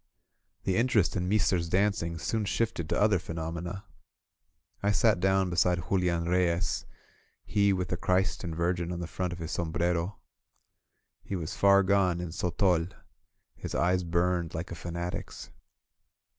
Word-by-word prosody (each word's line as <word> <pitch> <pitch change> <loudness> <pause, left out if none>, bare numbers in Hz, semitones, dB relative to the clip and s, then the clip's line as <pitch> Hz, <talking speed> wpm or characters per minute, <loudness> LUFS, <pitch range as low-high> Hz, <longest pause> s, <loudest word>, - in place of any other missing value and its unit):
The 95 - 0
interest 115 -5 +2
in 90 -1 -1
Meester's 95 -5 +2
dancing 95 -3 +1
soon 110 +5 -1
shifted 105 -7 -1
to - - +1
other 105 -3 +4
phenomena. 85 +3 -5 1.0
I 100 +1 +2
sat 110 -3 +3
down 95 0 +2
beside 85 0 +1
Julian 90 -3 +1
Reyes, 90 -1 0 0.6
he 100 -1 +2
with 90 -2 -1
the 90 - -1
Christ 90 +1 0
and 85 -2 -4
Virgin 85 +1 -1
on 85 - -4
the 85 - -3
front 90 +1 -3
of 90 - -5
his 80 -1 -5
som 85 -2 -2
brero. 85 +3 0 1.1
He 100 - -5
was 85 -3 -4
far 100 0 +5
gone 95 -3 +2
in 90 -1 -4
sotol 90 0 +1 0.4
— - - -32
^his - - -3
eyes 90 +1 +2
burned 85 0 0
like 80 +2 -5
a - - -4
fanatic's. 85 +1 -6
90 Hz, 155 wpm, -29 LUFS, 85-95 Hz, 1.1 s, far